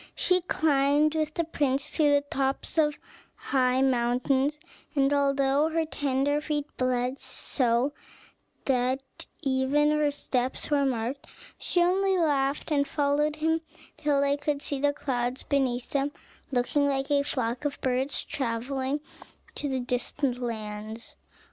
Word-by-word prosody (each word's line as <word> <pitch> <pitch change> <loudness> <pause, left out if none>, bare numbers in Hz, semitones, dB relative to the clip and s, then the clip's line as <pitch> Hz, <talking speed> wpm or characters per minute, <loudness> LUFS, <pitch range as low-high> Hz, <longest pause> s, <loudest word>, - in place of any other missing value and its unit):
She 365 0 +2
climbed 295 -2 +2
with 310 -1 -1
the 335 - +1
prince 280 -4 0
to 305 -2 +4
the 285 0 +4
tops 270 +4 0
of 300 -1 +2 0.4
high 255 -1 +1
mountains; 260 +3 +2 0.4
and 275 0 +3
although 280 +1 +2
her 325 0 0
tender 285 -1 0
feet 300 -1 -2
bled 255 +1 0
so 250 +1 0 0.7
that 260 +1 -1 0.2
even 275 +3 +2
her 300 -1 +2
steps 260 -1 -2
were 285 -1 +3
marked, 250 +2 -3 0.3
she 350 -2 +2
only 380 +2 +2
laughed, 290 -2 +1
and 285 -1 +2
followed 295 +1 +1
him 320 +1 +1 0.3
till 290 -2 +1
they 280 0 +2
could 290 0 -2
see 280 - -1
the 290 +1 +3
clouds 250 -3 -2
beneath 255 -3 0
them 280 0 0 0.4
looking 270 +3 +2
like 275 0 -1
a 285 -1 +4
flock 245 -3 -2
of 290 -1 -2
birds 260 +2 -1
travelling 265 +3 -2 0.5
to 270 -3 -1
distant 250 +1 -1
lands. 220 -1 -5
275 Hz, 135 wpm, -27 LUFS, 255-295 Hz, 0.7 s, to